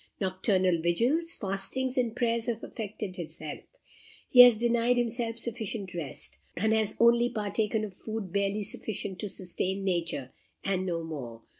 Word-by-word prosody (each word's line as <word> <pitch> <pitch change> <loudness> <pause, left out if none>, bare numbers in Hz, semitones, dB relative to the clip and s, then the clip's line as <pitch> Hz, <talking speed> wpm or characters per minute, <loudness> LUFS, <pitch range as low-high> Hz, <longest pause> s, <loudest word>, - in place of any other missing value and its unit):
Nocturnal 185 -2 +1
vigils, 250 - +2
fastings, 205 +7 -1
and 240 -3 0
prayers 235 -2 0
have 235 -1 -2
affected 210 -3 -6
his 165 -2 -6
health. 155 - -9 0.5
He 250 - +5
has 245 -2 +11
denied 240 +1 +2
himself 235 -1 -1
sufficient 220 -4 -4
rest, 165 -6 -6 0.2
and 220 +4 +2
has 220 -1 +1
only 235 +1 +5
partaken 215 -1 -1
of 205 -3 -5
food 215 -2 -6
barely 200 +1 0
sufficient 200 -2 -5
to 210 - -3
sustain 190 +1 -2
nature, 170 -8 -1 0.3
and 190 -1 0
no 170 -2 -1
more. 125 -8 -7
210 Hz, 150 wpm, -29 LUFS, 185-235 Hz, 0.5 s, has